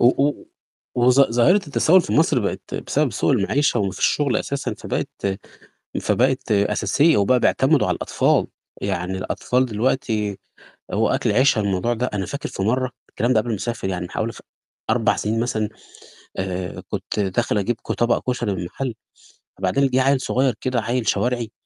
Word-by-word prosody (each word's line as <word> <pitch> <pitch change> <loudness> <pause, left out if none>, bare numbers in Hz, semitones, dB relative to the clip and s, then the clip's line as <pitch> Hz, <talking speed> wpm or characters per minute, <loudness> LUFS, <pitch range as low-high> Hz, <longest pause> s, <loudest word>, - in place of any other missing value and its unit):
و - - +3 0.2
و 145 - -6 0.6
وظ 125 +2 +5
ظاهرة 120 - +5
التسوّل 185 0 +3
في - - -4
مصر 155 -3 +3
بقت 100 - -4
بسبب - - 0
سوء - - +1
المعيشة 140 -5 +1
وما 100 -1 0
فيش 95 - +1
شُغل 145 -4 +1
أساسًا، 140 0 -3
فبقت 95 0 -3 0.6
فبقت 130 -2 +1
أساسية 105 - +3
وبقى 125 +5 +3
بيعتمدوا 135 +4 +3
على - - +1
الأطفال، - - +1 0.4
يعني 90 +2 -2
الأطفال 125 +6 0
دلوقتي 110 -3 -1 0.5
هو - - +1
أكل - - +1
عيشها 125 0 +3
الموضوع 100 +3 0
ده. 125 +2 -2
أنا 95 -2 -1
فاكر 140 +10 -5
في 95 - -4
مرّة 130 +4 0 0.2
الكلام 120 +3 0
ده 110 - +4
قبل 120 - -3
ما 110 - 0
أسافر 115 -1 -3
يعني 90 -1 -3
بحوالي - - -3
ف - - -12 0.5
4 - - +2
سِنين 110 +2 -1
مثلًا 110 -3 -1 0.7
آآ، 90 -1 -4
كنت 100 +1 -4
داخل 100 +1 0
أجيب 105 +4 0
ك - - -3
طبق 120 +1 0
كشري 120 -4 -1
من 95 - -4
المحل 115 +9 -4 0.7
وبعدين 95 +9 +2
جِه 130 0 +2
عيّل 135 0 +2
صغير 130 -2 +1
كده 130 -2 0
عيّل 120 0 -2
شوارعي، 120 -3 0
120 Hz, 170 wpm, -22 LUFS, 100-130 Hz, 0.7 s, وظ